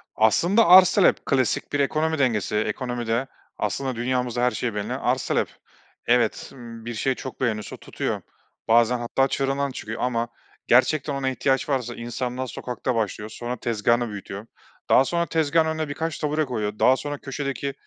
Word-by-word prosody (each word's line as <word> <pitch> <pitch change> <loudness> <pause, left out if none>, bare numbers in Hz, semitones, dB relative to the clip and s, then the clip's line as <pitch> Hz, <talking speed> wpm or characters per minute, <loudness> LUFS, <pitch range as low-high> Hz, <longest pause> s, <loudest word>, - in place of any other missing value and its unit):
Aslında, 175 - +4
arz 185 +1 +8
talep, 195 - +3
klasik 130 -2 0
bir 145 - +1
ekonomi 155 +3 +1
dengesi. 110 -6 +1
Ekonomide, 120 +2 -1 0.3
aslında, 135 -2 -2
dünyamızda 125 0 -1
her 125 - +3
şey 120 -2 -3
belli, 105 -1 -3
arz - - 0
talep. - - +1 0.6
Evet, 120 -2 +1
ımm, 115 -3 -10
bir 120 - -4
şey 130 +4 0
çok 130 - -8
beğeniliyorsa 110 -4 -2
tutuyor. - - -4 0.5
Bazen 120 +2 +4
hatta 135 +3 +1
çığrından 135 +1 -1
çıkıyor 110 -3 -6
ama 120 -1 0 0.4
gerçekten 140 +4 +3
ona 135 -1 -1
ihtiyaç 135 +1 0
varsa 125 -4 -1
insanlar 125 +2 -4
sokakta 125 +1 -3
başlıyor, 105 -1 -2
sonra 120 +3 -5
tezgâhını 115 +1 +1
büyütüyor. 100 0 -7 0.4
Daha 135 - +6
sonra 170 +2 0
tezgâhın 160 0 +2
önüne 160 -1 -2
birkaç 160 +1 -3
tabure 150 +1 0
koyuyor, 105 -5 -3
daha 130 - +5
sonra 145 +1 -4
köşedeki 140 0 -4
125 Hz, 160 wpm, -24 LUFS, 115-140 Hz, 0.6 s, arz